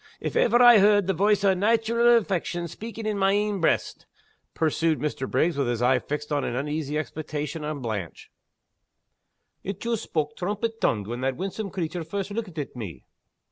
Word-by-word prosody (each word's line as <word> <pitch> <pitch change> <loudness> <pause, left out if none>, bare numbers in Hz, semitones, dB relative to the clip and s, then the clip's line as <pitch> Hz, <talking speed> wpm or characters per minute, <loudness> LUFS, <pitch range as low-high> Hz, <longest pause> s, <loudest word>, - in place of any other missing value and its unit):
If - - -4
ever 240 +1 +4
I 240 -3 +9
heard 205 0 +5
the 195 - +1
voice 205 +3 +2
o' 195 -1 +5
naitural 230 +4 +3
affection 175 -4 -2
speaking 225 +5 -8
in 210 -2 -1
my 195 0 +3
ain 205 -2 0
breast," 160 - 0 0.5
pursued 160 0 +1
Mr. 145 -3 -3
Bishopriggs, 165 -2 +1
with 140 -3 0
his 120 0 -1
eye 125 +1 +4
fixed 150 +3 -5
in 145 -1 +1
uneasy 150 +3 -2
expectation 155 0 -4
on 150 -2 -4
Blanche, 105 -7 -5 1.3
"it 195 0 -5
joost 230 -1 -2
spak' 150 -2 -2
trumpet 210 +5 -3
tongued 105 -3 +1
when 120 +4 -5
that 130 0 0
winsome 195 +3 -4
creature 175 -1 -3
first 195 +4 -4
lookit 205 -6 -5
at 145 -3 -5
me. 95 - -7
175 Hz, 175 wpm, -25 LUFS, 145-205 Hz, 1.3 s, I